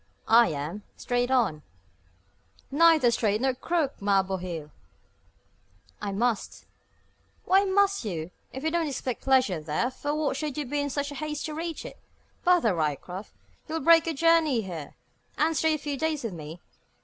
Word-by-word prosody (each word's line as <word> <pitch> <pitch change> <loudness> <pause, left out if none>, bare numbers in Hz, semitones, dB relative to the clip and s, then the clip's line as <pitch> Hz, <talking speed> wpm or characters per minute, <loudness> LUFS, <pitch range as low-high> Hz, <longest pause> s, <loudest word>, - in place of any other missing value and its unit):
"I 230 +1 +6
am, 155 +7 -4 0.2
straight 245 0 -1
on." 225 -13 +2 1.1
"Neither 310 -4 +5
straight 215 -2 +1
nor 265 +1 +1
crooked, 295 0 -2
ma 200 -1 +3
bohil!" 180 -5 -5 1.3
"I 205 -1 -3
must." 225 +2 -1 0.8
"Why 385 +2 +4
must 400 -1 +2
you? 175 -5 -4 0.2
If 265 - -7
you 320 - 0
don't 335 -1 0
expect 260 -3 -4
pleasure 255 -11 +2
there, 155 - -1
for 290 +3 -3
what 300 -3 -1
should 300 -1 -4
you 295 - -2
be 290 +3 -2
in 285 - -2
such 285 +1 -2
haste 300 +1 -4
to 310 - -4
reach 330 +1 -5
it? - - -9 0.4
Bother, 350 - +4
Ryecroft! 170 +5 -3 0.4
you'll 320 0 -3
break 330 0 +6
your 325 - -1
journey 320 -5 +3
here, 170 -7 -7 0.4
and 320 +1 +2
stay 315 +2 +2
a - - -2
few 290 -1 -4
days 315 -1 -1
with 225 -5 -3
me? 160 +1 -8
265 Hz, 160 wpm, -27 LUFS, 195-315 Hz, 1.3 s, I